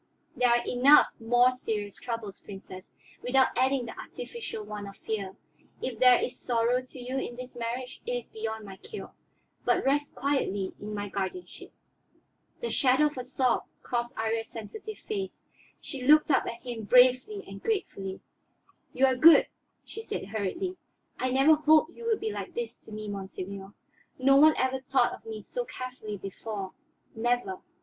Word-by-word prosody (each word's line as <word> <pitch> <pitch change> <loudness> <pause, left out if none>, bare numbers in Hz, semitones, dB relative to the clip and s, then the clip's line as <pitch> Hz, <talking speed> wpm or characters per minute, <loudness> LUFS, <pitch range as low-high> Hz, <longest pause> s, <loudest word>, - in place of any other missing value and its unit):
There 250 0 +3
are 240 0 +3
enough 265 +4 +6
more 245 +2 +4
serious 210 -5 -3
troubles, 230 -5 -5
Princess, 190 -2 -11 0.3
without 260 +1 +3
adding 260 0 +2
the 230 - -8
artificial 470 - -7
one 210 -1 -6
of 195 0 -11
fear. 200 -4 -4 0.4
If 245 -4 -4
there 250 -1 +7
is - - -3
sorrow 240 +1 +1
to 255 +1 -13
you 255 +2 -3
in 245 - -5
this 255 +1 -8
marriage, 245 +2 -4
it - - -1
is 245 -1 -4
beyond 220 0 -4
my 195 -1 -9
cure; 425 - -9 0.5
but - - +2
rest 290 +2 +1
quietly 205 -9 -1
in 210 +1 -6
my 205 0 -3
guardianship." 200 - -5 0.9
The 475 - -2
shadow 265 +2 +4
of 290 - -15
a - - -3
sob 255 -1 +1 0.2
crossed 240 -1 -2
Iría's 225 0 -1
sensitive 415 - -8
face; 395 -3 -5 0.4
she 275 -4 -7
looked 305 +4 +6
up - - +3
at 235 0 -6
him 235 -3 -5
bravely 255 - +5
and - - -10
gratefully. 195 - -3 0.7
"You 265 - +4
are 260 -1 +3
good," 315 +6 +7 0.4
she 445 - -7
said 200 - -5
hurriedly. 225 - -3 0.4
"I 255 - 0
never 270 +5 +5
hoped 310 +2 +4
you 470 - -9
would 450 -2 +1
be 435 +1 -2
like - - -6
this 475 0 -4
to - - -16
me, 215 0 -6
monseigneur. 195 0 -6 0.5
No 275 +1 +5
one 310 +2 +7
ever 260 0 +1
thought 260 - +2
of - - -11
me 440 -1 -6
so - - -4
carefully 255 - -6
before, 195 0 -6 0.4
never. 230 -4 -1
250 Hz, 170 wpm, -29 LUFS, 215-275 Hz, 0.9 s, there